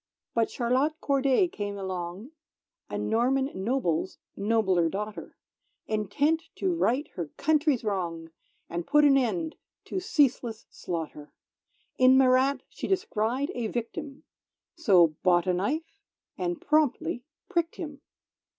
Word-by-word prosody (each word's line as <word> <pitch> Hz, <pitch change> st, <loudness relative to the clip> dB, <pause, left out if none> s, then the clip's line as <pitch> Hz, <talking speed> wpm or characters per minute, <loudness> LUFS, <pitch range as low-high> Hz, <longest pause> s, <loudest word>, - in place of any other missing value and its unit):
_"] -, -, -63 dB
But 230 Hz, -1 st, +2 dB
Charlotte 265 Hz, +6 st, 0 dB
Corday 275 Hz, +5 st, +2 dB
came 205 Hz, -9 st, -5 dB
along, 190 Hz, -, -5 dB, 0.6 s
A -, -, -3 dB
Norman 265 Hz, +4 st, +1 dB
noble's 190 Hz, -4 st, -1 dB, 0.2 s
nobler 200 Hz, -5 st, +2 dB
daughter, 210 Hz, +3 st, -6 dB, 0.5 s
Intent 220 Hz, +10 st, +1 dB
to 370 Hz, -2 st, 0 dB
Right 285 Hz, -3 st, +1 dB
her 170 Hz, -3 st, -5 dB
Country's 300 Hz, -4 st, +2 dB
Wrong, 170 Hz, -6 st, -3 dB, 0.4 s
And 170 Hz, 0 st, -4 dB
put 295 Hz, 0 st, +5 dB
an 280 Hz, -1 st, +6 dB
end 310 Hz, +5 st, 0 dB, 0.3 s
to -, -, -3 dB
ceaseless 260 Hz, -9 st, +1 dB
slaughter; 160 Hz, -4 st, -6 dB, 0.7 s
In 255 Hz, +1 st, +7 dB
Marat 265 Hz, +1 st, +4 dB
she -, -, -6 dB
descried 270 Hz, -, 0 dB
a 235 Hz, -2 st, -2 dB
victim, 270 Hz, +6 st, -5 dB, 0.5 s
So 180 Hz, -, +4 dB
bought 175 Hz, -2 st, +4 dB
a 185 Hz, -, +2 dB
knife 300 Hz, -, -2 dB, 0.4 s
and 175 Hz, -2 st, -2 dB
promptly 295 Hz, -5 st, +1 dB, 0.2 s
pricked 340 Hz, -4 st, -1 dB
him! 295 Hz, -4 st, -7 dB
240 Hz, 125 wpm, -28 LUFS, 190-290 Hz, 0.7 s, In